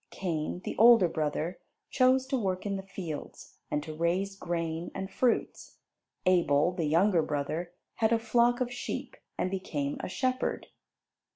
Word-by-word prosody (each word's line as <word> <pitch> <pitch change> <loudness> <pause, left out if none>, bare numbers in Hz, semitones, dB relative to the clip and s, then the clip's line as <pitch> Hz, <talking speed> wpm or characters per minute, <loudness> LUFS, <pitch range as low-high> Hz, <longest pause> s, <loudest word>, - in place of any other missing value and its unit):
Cain, 170 -1 -3
the - - -4
older 230 -4 +8
brother, 160 +2 -2 0.3
chose 260 0 +4
to 270 +1 -1
work 190 -6 -1
in 200 -1 -1
the 195 - -3
fields, 185 -5 -8
and 150 - -1
to 155 - -7
raise 180 +5 0
grain 170 -2 -3
and 190 0 -4
fruits. 240 +4 -1 0.5
Abel, 170 -3 +3
the 175 -3 -2
younger 170 +4 +3
brother, 155 +4 -3 0.3
had 220 -1 +2
a 230 - +5
flock 235 +2 +2
of 245 -1 -1
sheep 245 - -5 0.2
and 185 - -1
became 145 -7 -3
a - - -4
shepherd. 255 +5 -1
185 Hz, 155 wpm, -29 LUFS, 160-225 Hz, 0.5 s, older